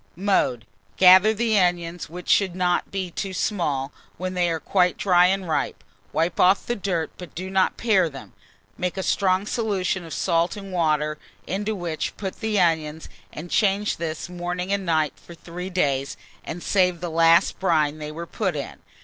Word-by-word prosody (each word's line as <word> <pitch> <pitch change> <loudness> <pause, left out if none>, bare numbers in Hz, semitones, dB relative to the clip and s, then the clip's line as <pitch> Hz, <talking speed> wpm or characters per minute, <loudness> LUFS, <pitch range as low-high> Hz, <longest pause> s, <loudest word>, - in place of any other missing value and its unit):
Mode. 180 - +1 0.3
Gather 185 +3 +7
the 220 -1 +1
onions, 175 -2 -1
which 180 +2 -9
should 190 -3 +3
not 180 -1 0
be 190 -2 -4
too 190 +2 -4
small, 150 -9 -1 0.3
when 185 +1 -4
they 175 -1 +1
are 165 -1 -1
quite 180 +1 +1
dry 180 -2 +4
and 190 0 -1
ripe; 160 - -2 0.3
wipe 165 +2 -1
off 185 +2 +4
the 240 - -1
dirt, 180 -6 -2
but 180 -2 -10
do 185 +2 -5
not 190 -1 +2
pare 195 -7 +2
them; 135 -3 -11 0.5
make 180 +1 -2
a 190 - -2
strong 190 0 +1
solution 195 -5 -1
of 165 - -10
salt 170 +1 +1
and 195 -2 -8
water, 155 -3 0 0.3
into 205 +4 -2
which 170 -4 -4
put 190 -2 -5
the 220 -2 0
onions, 160 -3 0 0.2
and 170 +3 -9
change 205 0 +1
this, 160 -1 -4
morning 180 +2 -3
and 195 -2 -2
night, 155 -2 +1
for 170 - -13
3 180 +2 -7
days, 140 -7 0 0.3
and 170 +2 -6
save 180 -3 +2
the 175 -1 -4
last 165 +1 +4
brine 155 -5 +1
they 150 0 -6
were 170 +2 -6
put 190 -1 -2
in. 140 - -5
180 Hz, 180 wpm, -24 LUFS, 165-190 Hz, 0.5 s, Gather